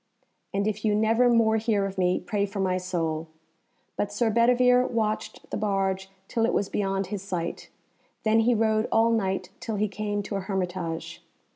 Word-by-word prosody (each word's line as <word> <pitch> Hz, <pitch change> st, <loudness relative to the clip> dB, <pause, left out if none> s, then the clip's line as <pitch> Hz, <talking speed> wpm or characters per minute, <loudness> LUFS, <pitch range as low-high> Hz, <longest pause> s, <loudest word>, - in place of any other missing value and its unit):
And 200 Hz, +1 st, 0 dB
if 215 Hz, -1 st, -2 dB
you 210 Hz, -2 st, +2 dB
never 225 Hz, +3 st, +3 dB
more 225 Hz, -2 st, +4 dB
hear 215 Hz, -3 st, +1 dB
of 195 Hz, -1 st, -5 dB
me, 180 Hz, 0 st, +2 dB
pray 205 Hz, -1 st, -1 dB
for 200 Hz, +1 st, -6 dB
my 185 Hz, -1 st, +1 dB
soul." 165 Hz, -3 st, -2 dB, 0.7 s
But 205 Hz, -, -2 dB
Sir 220 Hz, +2 st, +1 dB
Bedivere 250 Hz, +2 st, +4 dB
watched 215 Hz, -3 st, -2 dB
the -, -, -1 dB
barge 195 Hz, -2 st, -1 dB, 0.2 s
till 230 Hz, -, -1 dB
it -, -, -1 dB
was 200 Hz, -, 0 dB
beyond 195 Hz, -1 st, -1 dB
his 200 Hz, -, -3 dB
sight, 180 Hz, -4 st, -4 dB, 0.5 s
then 220 Hz, +1 st, +4 dB
he 235 Hz, +2 st, +3 dB
rode 220 Hz, 0 st, +2 dB
all 225 Hz, +1 st, +4 dB
night 190 Hz, -4 st, -1 dB
till 220 Hz, -, -4 dB
he 210 Hz, +1 st, +1 dB
came 205 Hz, 0 st, -3 dB
to 200 Hz, -, -3 dB
a -, -, -3 dB
hermitage. 180 Hz, -4 st, -4 dB
205 Hz, 180 wpm, -26 LUFS, 190-225 Hz, 0.7 s, more